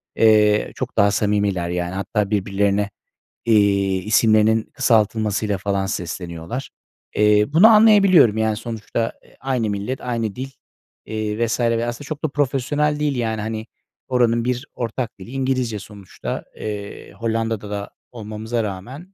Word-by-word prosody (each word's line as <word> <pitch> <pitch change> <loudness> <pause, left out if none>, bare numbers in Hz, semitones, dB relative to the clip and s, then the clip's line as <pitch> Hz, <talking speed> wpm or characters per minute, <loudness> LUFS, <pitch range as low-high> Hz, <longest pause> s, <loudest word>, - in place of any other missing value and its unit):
Eee, 105 -1 +4
çok - - -5
daha 100 0 +5
samimiler, 100 -4 0
yani, 90 0 -2
hatta 100 +1 -1
birbirlerine, 100 0 +1 0.6
eee, 100 -3 +3
isimlerinin 110 +2 +3
kısaltılmasıyla 110 -2 +1
falan 100 0 -1
sesleniyorlar. 90 +6 -5 0.5
Eee, 105 0 +4
bunu 185 +8 +8
anlayabiliyorum, 200 - +6
yani, 110 -1 +1
sonuçta, 115 0 -3
eee, - - -23
aynı 125 -5 -1
millet, 105 +6 -3
aynı 115 -4 -2
dil, 130 +2 -5 0.6
eee, 110 +1 -2
vs. 120 +2 -2
ve 115 -1 +1
aslında 120 +4 -5
çok 155 +1 -6
da 155 - +1
profesyonel 145 +2 0
değil, 145 -2 0
yani, 110 -2 -1
hani, 110 +1 -4 0.4
oranın 120 -2 +2
bir 125 +2 -1
ortak 115 -2 -4
dili 95 - -10
İngilizce 130 -5 -1
sonuçta. 100 -1 -7
Eee, 105 -1 -7
Hollanda'da 115 -2 -2
da 100 0 -4 0.2
olmamıza 110 0 -4
rağmen 125 - -7
110 Hz, 135 wpm, -21 LUFS, 100-125 Hz, 0.6 s, bunu